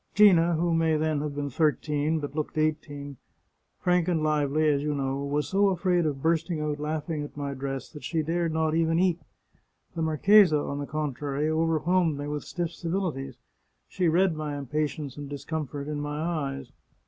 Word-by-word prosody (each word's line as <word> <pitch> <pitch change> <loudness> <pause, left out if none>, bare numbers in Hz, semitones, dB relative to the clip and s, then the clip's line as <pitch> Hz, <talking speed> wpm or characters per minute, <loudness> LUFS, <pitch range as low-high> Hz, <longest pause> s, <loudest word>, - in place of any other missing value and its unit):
" - - -41
Gina, 175 -5 +6
who 170 +1 +1
may 165 -1 +2
then 155 -1 0
have 150 -1 -4
been 145 -1 -3
thirteen, 150 +1 +1
but 145 -2 -5
looked 155 0 -3
eighteen, 145 -3 -2 0.6
frank 180 -1 +2
and 165 -4 +1
lively, 150 0 +2
as 145 -2 +2
you 150 0 -1
know, 135 -1 -1
was 145 +1 -1
so 200 +1 +3
afraid 180 -2 +1
of 135 -3 -3
bursting 165 0 +1
out 150 -1 -2
laughing 155 +1 -2
at 145 0 -8
my 140 -1 -3
dress 135 -1 -4
that 150 - -11
she 160 -2 -1
dared 165 +1 0
not 160 0 +1
even 165 0 +2
eat. 180 -1 +2 0.8
The 165 - -2
marchesa, 160 +2 +5
on 140 -1 -3
the 145 - -4
contrary, 150 0 -2
overwhelmed 165 0 +2
me 145 - -4
with 150 0 -3
stiff 175 -2 -3
civilities; 165 -8 -3 0.5
she 180 - 0
read 175 +1 +3
my 150 -2 -4
impatience 145 0 -3
and 145 -1 -7
discomfort 145 0 -4
in 150 -1 -3
my 145 0 -3
eyes. 140 -6 -3
155 Hz, 185 wpm, -27 LUFS, 145-165 Hz, 0.8 s, Gina